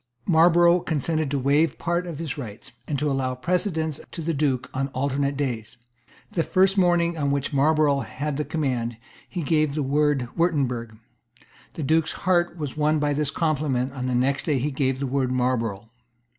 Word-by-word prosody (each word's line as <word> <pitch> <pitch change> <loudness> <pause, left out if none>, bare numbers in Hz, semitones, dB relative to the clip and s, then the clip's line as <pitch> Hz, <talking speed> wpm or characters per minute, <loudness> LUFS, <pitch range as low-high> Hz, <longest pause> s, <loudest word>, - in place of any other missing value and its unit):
Marlborough 175 +1 +5
consented 155 -1 -1
to 140 - -1
waive 140 +3 +2
part 175 +1 -1
of 165 -4 -5
his 160 -3 -3
rights, 115 -8 -8 0.2
and 145 - -1
to 145 +1 0
allow 130 -1 -1
precedence 160 0 -1
to 165 - -6
the 165 +1 -1
Duke 140 -4 0
on 135 +1 -1
the - - -17
alternate 140 +1 -1
days. 120 -7 -3 0.5
The 170 - 0
first 190 +3 +3
morning 175 -3 +2
on 140 -1 +1
which 140 +1 -1
Marlborough 145 0 +3
had 140 +1 -4
the 150 - 0
command, 125 -8 -2 0.3
he 175 -3 -4
gave 155 0 +1
the 150 - 0
word 145 -2 +1
"Wirtemberg." 125 -10 0 0.8
The 160 - -4
Duke's 160 +2 +2
heart 175 -1 +2
was 150 -5 -4
won 155 +1 +2
by 145 -1 +1
this 150 -1 +1
compliment 140 -5 0
and 135 - -9
on 125 - -2
the 125 - 0
next 135 +4 0
day 150 -3 +2
he 145 +4 -1
gave 135 -1 0
the 140 - -2
word 130 -1 0
"Marlborough." 115 -4 -1
145 Hz, 185 wpm, -24 LUFS, 130-160 Hz, 0.8 s, Marlborough